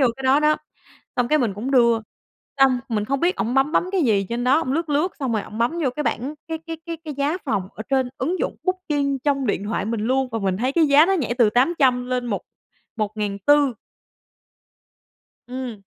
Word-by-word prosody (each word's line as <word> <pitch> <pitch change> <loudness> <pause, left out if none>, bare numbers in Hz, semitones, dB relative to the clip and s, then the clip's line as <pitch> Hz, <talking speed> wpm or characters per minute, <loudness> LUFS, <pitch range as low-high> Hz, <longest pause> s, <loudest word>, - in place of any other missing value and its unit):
vô 265 - +5
cái 270 - -9
đó 265 +3 +4
đó, 305 0 +3 0.6
xong 245 -1 +1
cái 305 - +3
mình 220 -7 0
cũng 240 +6 -4
đưa. 235 -3 +4 0.6
Xong 265 -2 +5
mình 210 -3 -1
không 275 +3 -1
biết 360 +2 +2
ổng 240 +3 -1
bấm 270 +3 +2
bấm 355 - +2
cái 375 - +2
gì 205 -7 +2
trên 240 +1 -2
đó, 260 +4 +4
ổng 260 - -2
lướt 330 +2 -1
lướt 300 +6 0
xong 260 -4 -1
rồi 215 - 0
ổng 215 - -9
bấm 235 +5 +2
vô 260 - +2
cái 300 - -1
bảng, 280 +2 -2
cái 320 - -3
cái 325 0 -7
cái 335 -1 -4
cái 300 - -5
giá 285 +6 0
phòng 195 - -1
ở 215 - -6
trên 265 -2 +2
ứng 360 +2 -1
dụng - - -2
Booking 295 -7 -1
trong 275 -3 +1
điện 200 -1 -1
thoại 210 -1 -2
mình 225 0 -2
luôn 260 +4 +1
và 225 - -1
mình 190 -2 0
thấy 255 +5 -1
cái 325 +1 +4
giá 295 +4 +6
nó 390 - +2
nhảy 255 -9 -1
từ 225 -3 +5
800 255 -1 +2
lên 250 -1 -2
một 205 -4 -2 0.5
một 215 -1 -2
ngàn 205 -2 -2
tư. 285 +3 +3 1.7
Ừm. 250 -5 -6
260 Hz, 230 wpm, -22 LUFS, 230-295 Hz, 1.7 s, giá